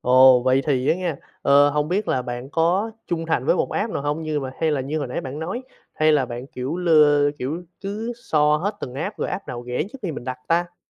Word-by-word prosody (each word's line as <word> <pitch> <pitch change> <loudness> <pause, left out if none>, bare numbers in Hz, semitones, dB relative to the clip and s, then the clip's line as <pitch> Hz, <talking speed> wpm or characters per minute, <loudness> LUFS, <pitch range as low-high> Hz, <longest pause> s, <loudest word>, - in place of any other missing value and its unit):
Ồ, 130 0 +6
vậy 130 +1 +3
thì 130 -3 +1
á - - +5
nghen. 175 -4 -2 0.3
Ờ, 140 +1 +6
hông 150 +1 0
biết 200 +4 -1
là 130 - +1
bạn 125 +1 -6
có 175 +8 +1 0.2
trung 165 -1 -2
thành 160 -6 0
với 180 - +4
một - - 0
app 220 +1 -1
nào - - -2
hông? 145 +2 -2
Như 155 -2 -1
mà 130 -1 -4
hay 160 -1 +2
là 145 - 0
như 140 +4 -2
hồi 145 -4 -3
nãy 125 - -3
bạn 135 +2 -6
nói, 185 +11 -4 0.3
hay 155 0 +3
là 140 -4 +2
bạn 120 +2 -6
kiểu, 135 +4 -4
lơ 150 -4 +4
kiểu, 155 +8 -4 0.2
cứ 210 +4 -4
so 150 0 +3
hết 205 +6 -2
từng 125 - -6
app 160 +10 -4
rồi - - -1
app 195 - -5
nào 120 -1 -6
rẻ 125 +3 -1
trước 275 - -9
khi 180 -5 -2
mình 130 - -7
đặt 130 0 -4
ta? 175 +1 +1
150 Hz, 260 wpm, -23 LUFS, 130-170 Hz, 0.3 s, Ồ